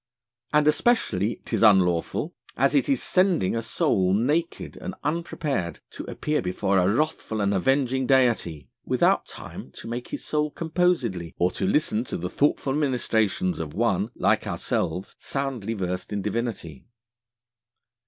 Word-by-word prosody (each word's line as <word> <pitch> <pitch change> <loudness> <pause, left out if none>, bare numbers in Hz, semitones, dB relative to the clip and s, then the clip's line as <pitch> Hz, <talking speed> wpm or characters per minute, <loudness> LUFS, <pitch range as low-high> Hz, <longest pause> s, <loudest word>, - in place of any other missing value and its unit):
And 150 0 +3
especially 120 - +2
'tis - - -1
unlawful, 95 - +3 0.2
as - - +3
it 280 - +2
is 275 - +2
sending 180 - +2
a 115 - 0
Soul 95 -4 +1
naked 150 +10 -1
and 190 - -6
unprepared 150 - -2
to - - -7
appear 150 0 -1
before 95 +1 +1
a 90 +2 +3
wrathful 130 -4 -1
and 100 -1 +1
avenging 130 +5 +1
Deity 115 - +2 0.2
without - - +2
time - - -9
to - - -9
make 120 +2 -4
his - - -6
Soul 150 0 0
composedly 155 - 0
or 90 +1 +2
to 95 - -2
listen 115 -2 +1
to - - -4
the 90 +1 -4
thoughtful 140 -1 +1
ministrations 110 -10 0
of 75 -2 -5
one - - +1
(like - - +1
ourselves) 90 +4 -2
soundly 130 -6 -3
versed 90 -1 -3
in 100 -1 -2
Divinity. 105 - -4
115 Hz, 145 wpm, -25 LUFS, 95-150 Hz, 0.2 s, And